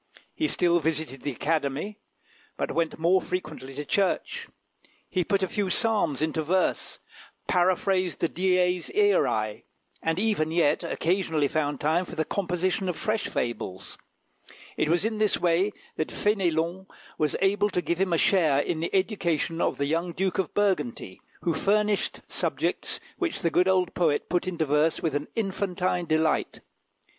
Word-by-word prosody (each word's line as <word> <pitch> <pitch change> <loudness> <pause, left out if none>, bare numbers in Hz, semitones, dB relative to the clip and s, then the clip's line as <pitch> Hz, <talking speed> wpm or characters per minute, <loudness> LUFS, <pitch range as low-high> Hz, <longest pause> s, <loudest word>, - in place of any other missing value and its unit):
He 310 - 0
still 175 - +3
visited 155 -4 -2
the 145 - -2
Academy, 155 - -2 0.6
but - - -1
he - - -5
went 165 -1 0
more 175 +3 +3
frequently 155 -7 -5
to 145 +1 -4
church; 205 - 0 0.6
he 185 -2 0
put 195 +1 +1
a - - +1
few 200 +1 -1
psalms 195 - +1
into 160 0 0
verse, 180 +4 0 0.5
paraphrased 185 -1 +1
the 170 - +2
Dies 180 0 +1
Iræ, 110 - +2 0.4
and 165 0 0
even 200 -6 +1
yet 160 -2 +2
occasionally 165 -4 0
found 145 -1 -1
time 160 +5 +1
for 175 - -9
the 160 -1 0
composition 185 +1 -1
of 175 - -3
fresh 215 0 -1
fables. 115 -6 -4 0.8
It - - 0
was 175 +4 +2
in 220 -1 -1
this 215 -2 +3
way 175 +4 +2 0.3
that 155 - 0
Fénélon 185 -2 0 0.3
was 150 -2 +1
able 205 +2 +2
to 180 - -1
give 175 0 -1
him 190 -2 +1
a 165 - +3
share 160 -6 +3
in 155 +3 0
the 165 - -1
education 170 -5 0
of - - +1
the 140 - 0
young 165 +4 -1
Duke 190 +1 -1
of 190 - 0
Burgundy, 150 - -1 0.2
who 170 - +1
furnished 210 +2 +1
subjects - - -1 0.2
which 345 - -2
the 170 - +2
good 180 +3 +3
old 185 -2 +2
poet 160 -5 +1
put 175 +1 0
into 170 -3 -1
verse 150 +2 +1
with 160 -4 0
an 145 +1 -2
infantine 185 -4 -1
delight. 155 0 +1
175 Hz, 160 wpm, -27 LUFS, 155-190 Hz, 0.8 s, still